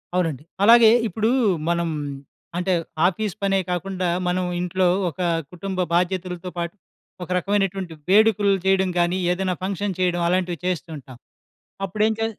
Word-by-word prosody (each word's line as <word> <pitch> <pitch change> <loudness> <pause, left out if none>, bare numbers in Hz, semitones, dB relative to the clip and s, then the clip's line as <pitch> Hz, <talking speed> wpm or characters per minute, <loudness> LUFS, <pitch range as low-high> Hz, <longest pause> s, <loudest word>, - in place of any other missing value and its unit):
అవునండి. 160 -6 -1 0.2
అలాగే 230 +1 +8 0.2
ఇప్పుడూ 220 +3 0 0.4
మనం 170 -1 0 0.7
అంటే, 180 +1 0 0.3
ఆఫీస్ 195 +2 -2
పనే 195 -1 +2
కాకుండా 180 +1 -2 0.2
మనం 180 +1 0
ఇంట్లో 180 +1 0 0.2
ఒక 170 - -14 0.3
కుటుంబ 185 +1 -5
బాధ్యతలతో 180 0 -1
పాటు 170 +1 -3 0.5
ఒక 175 - -10
రకమైనటువంటి 195 -2 -1 0.2
వేడుకులు 210 0 +4
జేయడం 190 0 +3
గానీ, 175 +1 +2
ఏదైనా 185 0 -1
ఫంక్షన్ 195 0 -2
చేయడం 175 -1 +1
అలాంటివి 180 -1 0
చేస్తూంటాం. 155 -8 -4 0.7
అప్పుడేం 215 +4 +1
చే 225 - +1
185 Hz, 125 wpm, -23 LUFS, 175-195 Hz, 0.7 s, అలాగే